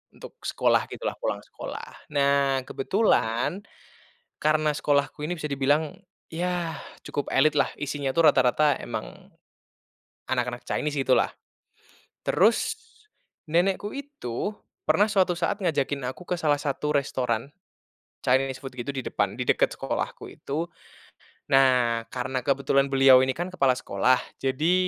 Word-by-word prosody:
untuk - - -12
sekolah - - +2
gitulah, - - -4
pulang - - -2
sekolah. - - -9
Nah, 140 -1 +3
kebetulan, 130 - +1 0.8
karena 155 0 +3
sekolahku 145 0 0
ini 175 +2 -3
bisa 150 - -3
dibilang, 145 +4 +1 0.4
yah 175 -1 -2 0.3
cukup 145 - -3
elit 150 +3 +4
lah, - - +2
isinya 145 -2 -2
tuh 165 -1 +5
rata-rata 140 +3 +3
emang, - - -7 1.0
anak-anak 125 -1 -2
Chinese, 150 -1 -1
gitu 130 -1 +3
lah. - - +1 1.0
Terus, 235 - +3 0.7
nenekku 190 +5 +1
itu 275 - -4 0.4
pernah 205 - +4
suatu 195 -3 +2
saat 175 +4 -1
ngajakin 145 -4 0
aku 180 - -13
ke 180 - 0
salah 145 -3 +2
satu 150 +1 -1
restoran, 130 -2 -1 0.7
Chinese 130 +1 +2
food 135 -1 -7
gitu, 120 +3 -5
di 130 - -3
depan, 100 0 -1
di - - 0
dekat - - +2
sekolahku - - -3
itu. 155 +4 -4 0.9
Nah, 125 -3 +4
karena 130 +1 -2
kebetulan 140 0 +2
beliau 135 -1 +7
ini 130 - 0
kan, 175 +3 -4
kepala 135 -7 +3
sekolah, 125 +4 +2 0.2
jadi 145 +6 +1
140 Hz, 130 wpm, -26 LUFS, 130-165 Hz, 1.0 s, beliau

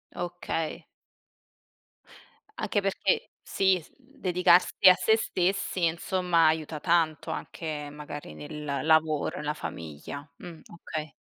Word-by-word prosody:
Okay. 175 -2 -4 1.7
Anche 205 - -1
perché 195 0 0
sì, 190 -1 +2 0.2
mhmm, 270 +1 -24
dedicarsi 180 -1 +4 0.2
a - - +9
se 220 +5 +3
stessi, 185 -3 0
insomma, 170 0 +2
aiuta 155 -1 0
tanto 165 -3 +1
anche 150 -3 -5
magari 145 - -8
nel 140 - -5
lavoro, 160 -2 +2
nella 150 0 -2
famiglia. 85 - -7
Mh. 170 -3 -10 0.2
Okay. 155 -2 -5
160 Hz, 105 wpm, -28 LUFS, 150-180 Hz, 1.7 s, a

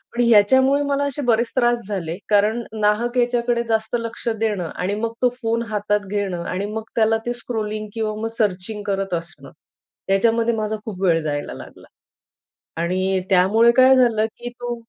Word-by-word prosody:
पण 245 - +1
याच्यामुळे 260 +6 +4
मला 285 0 0
असे 285 +1 -2
बरेच 235 0 +2
त्रास 240 -2 +1
झाले, 175 -4 -4
कारण 215 +3 +2 0.2
नाहक 235 +4 +1
याच्याकडे 240 -1 +1
जास्त 220 +1 0
लक्ष 230 +1 -6
देणं 205 -7 -1
आणि 190 +3 -2
मग 230 0 -2
तो 250 - +4
फोन 230 0 0
हातात 210 -1 -1
घेणं 195 -4 -2
आणि 190 +3 -3
मग 220 0 -3
त्याला 225 0 +3
ते 240 - -1
स्क्रॉलिंग 215 -3 -4
किंवा 220 -2 -2
मग 225 - -1
सर्चिंग 205 0 -1
करत 195 -1 -2
असणं, 165 -5 -6 0.6
याच्यामध्ये 230 +4 +2
माझा 215 0 -2
खूप 195 -4 -7
वेळ 165 -3 +3
जायला 145 -1 -3
लागला. - - -12 0.9
आणि 185 +2 0
त्यामुळे 205 +6 +5
काय 260 +1 +7
झालं 230 -4 +3
की 240 0 -6
तो 240 0 -3
220 Hz, 165 wpm, -21 LUFS, 195-235 Hz, 0.9 s, काय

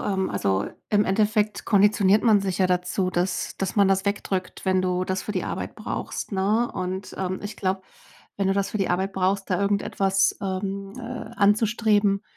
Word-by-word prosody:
ähm, 190 -2 -1
also, 95 0 0 0.2
im 205 0 +4
Endeffekt 210 +1 +1
konditioniert 205 0 +4
man 220 -4 +5
sich 190 -2 -2
ja 190 - +4
dazu, 180 +1 0
dass 180 +1 -1
dass 195 -1 -2
man 200 -2 +5
das 195 0 +2
wegdrückt, 195 -2 -3
wenn 185 0 +3
du 180 0 0
das 185 0 -2
für 210 - -4
die 185 - -2
Arbeit - - -4
brauchst, - - -5
ne? 210 +5 +1
Und, 185 +1 -4
ähm, 185 0 -2
ich 205 +1 -6
glaube, 190 0 -1 0.6
wenn 195 -1 0
du - - +3
das 200 0 0
für - - -3
die 195 - 0
Arbeit 190 +2 0
brauchst, 195 +1 0
da 180 - +2
irgendetwas, 195 -1 +1
ähm, 195 +1 -3
äh, 235 - -6
anzustreben, 210 -1 +3
195 Hz, 185 wpm, -24 LUFS, 185-205 Hz, 0.6 s, man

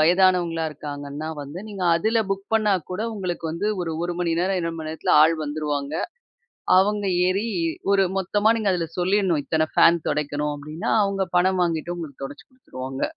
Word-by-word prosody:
வயதானவங்களா 175 -1 +3
இருக்காங்கன்னா 145 +1 -6
வந்து, 145 +5 -8
நீங்க 195 -3 -4
அதுல 220 +5 +1
புக் 195 +1 -6
பண்ணா 210 -3 +3 0.2
கூட 200 +4 -2
உங்களுக்கு 180 -5 -3
வந்து 200 +6 -1
ஒரு, 165 -2 -3
1 175 - -2
மணி 170 -2 +1
நேரம், 190 +1 +1
2 165 0 -3
மணி 155 0 -5
நேரத்துல 160 - 0
ஆள் 165 +1 +4
வந்துருவாங்க. 145 -1 -3 0.9
அவங்க 205 +1 +2 0.2
ஏறி, 195 +5 0 0.4
ஒரு 195 -1 +4
மொத்தமா 205 +3 +1
நீங்க 215 -3 0
அதுல 170 -2 -1
சொல்லிடணும், 185 -3 +2
இத்தன 155 +2 +1
ஃபேன் 170 -1 +5
துடைக்கணும் 150 0 -1
அப்டின்னா 150 +3 -5
அவங்க 195 -1 -1
பணம் 185 +1 +3
வாங்கிட்டு, 170 0 -1
உங்களுக்கு 145 -5 -8
துடைச்சு 145 +1 -9
குடுத்துருவாங்க. 135 - -8
170 Hz, 165 wpm, -23 LUFS, 150-195 Hz, 0.9 s, ஃபேன்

